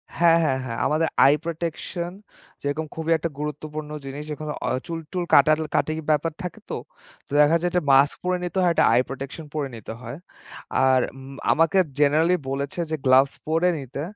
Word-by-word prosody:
হ্যাঁ, 165 -1 +5
হ্যাঁ, 130 -3 +1
হ্যাঁ। 115 -2 -4
আমাদের 160 +2 +2 0.2
আই 140 - +7
প্রটেকশন, 170 +1 -4 0.5
যেরকম 145 +3 -2
খুবই 160 0 -2
একটা 170 - -3
গুরুত্বপূর্ণ 150 0 -5 0.2
জিনিস। 145 +2 -6
এখানে 150 0 -5
অ - - +1 0.2
চুল-টুল 165 +2 -4
কাটা-কাটি 155 +2 +3 0.2
ব্যাপার 155 +2 +2
থাকে 180 - -6
তো। - - -3 0.5
তো - - -29
দেখা 150 +3 +5
যায় 175 - +1
একটা 180 -3 +1
মাস্ক 140 +1 +5
পড়ে 180 0 +1
নিতে 180 +1 -4
হয়, 175 -1 +4
একটা - - +4
আই 125 - +5
প্রটেকশন 135 +4 -7
পড়ে 145 -3 -2
নিতে 110 0 -8
হয়। 125 +5 -7 0.7
আর 130 -1 +5 0.2
উম 135 +1 -10 0.2
আমাকে 165 +4 +3 0.2
জেনারাল্লি 155 +5 +4
বলেছে 140 +5 -3
যে, - - +1
gloves 130 +1 +5
পড়ে 165 +3 +2
নিতে। 135 +1 -6
155 Hz, 175 wpm, -24 LUFS, 140-165 Hz, 0.7 s, আই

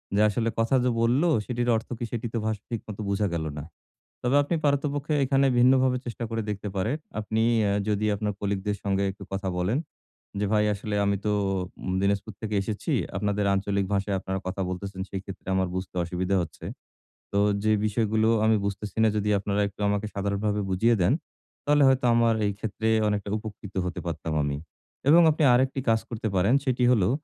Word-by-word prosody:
যে 105 - +4
আসলে 115 +2 0
কথা 115 +4 +2
যে 125 - +2
বলল 120 +6 +3 0.2
সেটির 120 -1 -1
অর্থ 110 - -3
কি 120 - -2
সেটি 120 0 -3
তো - - 0
ভাষা 110 -2 -2
ঠিক 115 - -2
মত 105 -2 -7
বুঝা 100 +1 +1
গেল 80 -2 -2
না। 75 - -5 0.6
তবে 125 +3 +2
আপনি 145 +4 -2
পারতপক্ষে 145 +1 0
এখানে 135 +1 +3
ভিন্নভাবে 130 +1 +4
চেষ্টা 120 0 -4
করে 115 0 -1
দেখতে 105 0 -4
পারেন। 110 +9 0 0.2
আপনি 110 +1 -1 0.2
অ্যা 100 - +1 0.2
যদি 105 0 +1
আপনার 105 +1 -2
কলিগদের 100 0 -1
সঙ্গে 100 -1 0
একটু 100 +1 -11
কথা 95 0 -2
বলেন 95 +9 +1 0.6
যে - - +1
"ভাই 105 -1 +3
আসলে 105 +1 -5
আমি 100 0 +2
তো 105 - +2 0.7
দিনাজপুর 100 +2 0
থেকে 110 -1 -3
এসেছি। 105 - -3 0.2
আপনাদের 105 +1 0
আঞ্চলিক 100 0 0
ভাষায় 100 0 0
আপনারা 95 0 -3
কথা 95 +1 -2
বলতেছেন, 95 +1 -5
সেই 95 - -3
ক্ষেত্রে 95 - -10
আমার 95 -1 +1
বুঝতে 95 0 -5
অসুবিধা 90 +3 -1
হচ্ছে। 80 -2 -9 0.7
তো 100 - +2 0.2
যে 110 - +3
বিষয়গুলো 110 +1 +1 0.2
আমি 110 0 +4
বুঝতেছি 100 0 -4
না - - +5
যদি 105 0 0
আপনারা 100 +1 -1
একটু 100 - -13
আমাকে 100 +1 0
সাধারণভাবে 100 +1 -1
বুঝিয়ে 110 +6 +3
দেন, 90 +7 +4 0.5
তাহলে 145 0 +4
হয়তো 130 -1 +3
আমার 115 -1 +4
এই 100 - +1
ক্ষেত্রে 110 0 -3 0.2
অনেকটা 105 -1 -1
উপকৃত 105 -2 -9
হতে 90 -3 -4
পারতাম 80 -1 -3
আমি।" 70 0 -1 0.5
এবং 165 +3 +8
আপনি 155 +1 0
আরেকটি 130 +2 +2
কাজ 110 0 +4
করতে 115 -1 -3
পারেন 95 +6 +3
সেটি 125 -2 +1
হলো 100 -7 +3
105 Hz, 185 wpm, -26 LUFS, 100-115 Hz, 0.7 s, এবং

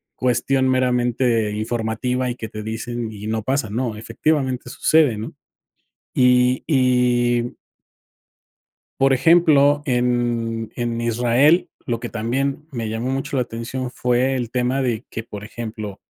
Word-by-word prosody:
cuestión 130 +2 +1
meramente 125 -3 +1
informativa 115 +3 -2
y 120 - -3
que 115 - -6
te 105 0 -7
dicen 115 +1 -4
y 105 0 -8
no 110 -1 -2
pasa, 135 -3 -1
¿no?, 115 0 -2
efectivamente 130 +1 -1
sucede, 145 -3 +3
¿no? 110 - -6 0.8
Y 125 0 +4
y 125 -3 +2 1.5
por 135 0 +4
ejemplo, 145 -1 +4
en 120 -3 0
en 120 -1 -2
Israel, 120 +8 +3 0.2
lo 115 -2 -2
que 120 - -5
también 135 +6 -2
me 115 -5 -4
llamó 115 +4 -2
mucho 135 +1 -2
la 130 - +2
atención 120 +2 -5
fue 125 +2 +1
el 120 -3 -3
tema 125 +2 0
de 120 -3 -1
que, 115 - -5
por 105 -2 -8
ejemplo, 110 -3 -7
120 Hz, 135 wpm, -21 LUFS, 115-130 Hz, 1.5 s, Y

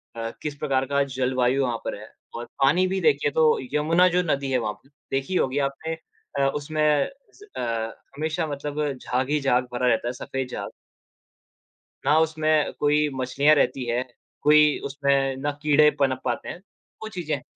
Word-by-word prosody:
अ, 115 0 -3
किस 150 -2 -4
प्रकार 135 -2 0
का 140 0 +1
जलवायु 130 0 0
वहाँ 120 -2 -1
पर - - -2
है 105 - -12 0.2
और 120 - -5 0.2
पानी 170 +7 +4
भी 190 +1 -1
देखिये 145 -3 +2
तो 155 0 +4 0.2
यमुना 165 +4 +4
जो 180 +1 +2
नदी 140 -4 -1
है 130 - +3
वहाँ 110 -3 -2
पर 135 - -25 0.2
देखी 135 +6 -1
ही 185 - +3
होगी 130 +1 0
आपने 160 +4 -5 0.5
अ, 135 - +3
उसमें 155 +1 -2 0.2
अ, 390 +9 -11 0.5
हमेशा 160 +2 -2
मतलब 145 +1 -4 0.2
झाग 130 +1 -2
ही 150 0 +2
झाग 125 -2 +2
भरा 125 +1 0
रहता 120 0 +2
है। 120 - -2
सफ़ेद 135 +1 -4
झाग। - - -5 1.4
ना 150 +2 +5
उसमें 155 -1 +1
कोई 150 +1 +3
मछलियाँ 135 +4 +3
रहती 135 -3 +1
हैं, 120 +2 0 0.4
कोई 150 0 +5
उसमें 140 -1 +1
ना 145 +2 -2
कीड़े 150 0 +5
पनप 130 -2 +1
पाते 120 -2 -2
हैं। - - -6 0.4
वो 220 - -4
चीज़ें 175 -7 -3
हैं। 125 - -12
140 Hz, 180 wpm, -24 LUFS, 130-155 Hz, 1.4 s, ना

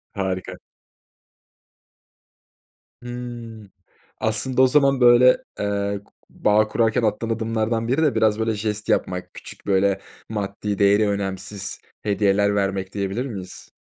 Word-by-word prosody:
Harika. 95 -2 -3 2.4
Hımm. 120 -4 -8 0.5
Aslında, 115 +4 +1
o - - +7
zaman, 140 0 +3
böyle, 125 +1 +7 0.2
ııı, 100 0 -2
ku - - -29 0.2
bağ 105 +1 +2
kurarken 115 +1 +1
attığın 115 +1 -1
adımlardan 115 0 -1
biri 135 +6 +1
de 150 -3 +3
biraz, 110 -1 +2
böyle, 110 0 0
jest 105 0 -3
yapmak, 90 -1 -1
küçük, - - -11
böyle, 95 0 +2 0.3
maddi 105 -1 -3
değeri 100 +1 +4
önemsiz 100 0 -4 0.2
hediyeler 100 0 +2
vermek, 95 -1 -1
diyebilir 100 +5 -2
miyiz? 95 -7 -8
105 Hz, 115 wpm, -22 LUFS, 100-115 Hz, 2.4 s, o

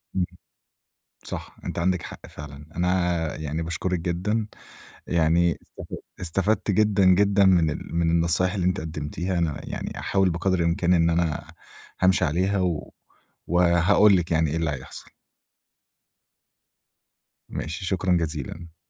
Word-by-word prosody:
آمم، 90 -2 +2 1.0
صح، - - -7
أنتِ - - -3
عندِك 90 0 +1
حق - - -10
فعلًا. 75 0 -10
أنا 90 -2 0
يعني 80 +1 -3
باشكرِك 85 +2 -2
جدًا، 95 +6 -1 0.6
يعني 85 0 +2 0.2
استف - - -6 0.3
استفدت 95 +5 +1
جدًا، 100 -1 +3
جدًا 100 +2 +5
من 85 -4 +4
ال 80 - -6
من 85 -1 +2
النصايح 85 +3 +2
اللي 95 -4 -1
أنتِ 90 +2 +1
قدّمتيها، 80 +4 -3
أنا 80 -3 -1
يعني - - -5
أحاول 95 -1 +2
بقَدْر 90 +2 0
الإمكان 85 +1 +2
إن 85 -1 +4
أنا 80 -2 -1 0.5
هامشِي 95 -1 +4
عليها 95 +6 +1
و 85 -4 -2 0.5
وهاقول 90 +4 +5
لِك 85 -1 -2
يعني 80 -1 +2
إيه 80 - -1
اللي 80 -2 0
هيحصَل. 65 -2 -8 2.4
ماشي، 85 +5 -5
شكرًا 90 -1 +1
جزيلًا. 80 +1 -5
85 Hz, 130 wpm, -25 LUFS, 80-95 Hz, 2.4 s, جدًا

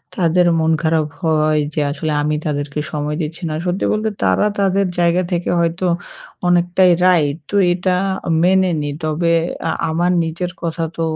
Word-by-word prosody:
তাদের 175 0 +2
মন 160 0 +2
খারাপ 160 -1 +2 0.2
হয় 155 -2 +2
যে - - -2
আসলে 155 +2 -3
আমি 150 +1 0
তাদেরকে 145 -1 -3
সময় 150 0 -2
দিচ্ছি 160 +3 -5
না। - - -3
সত্যি 180 +1 -1
বলতে 215 +1 0
তারা - - +2
তাদের 195 0 +2
জায়গা 175 +1 +3
থেকে 175 -1 -1
হয়তো 170 +2 0 0.6
অনেকটাই 175 +1 +3
রাইট। 155 -5 +3
তো - - -3 0.2
এটা 180 +1 0 0.5
মেনে 190 +1 +3
নিই। 145 -1 -3
তবে 160 +2 0 0.4
আ - - +1 0.2
আমার 175 +3 +1
নিজের 170 +2 -3
কথা 165 0 -2
তো - - -2
170 Hz, 160 wpm, -18 LUFS, 155-180 Hz, 0.6 s, জায়গা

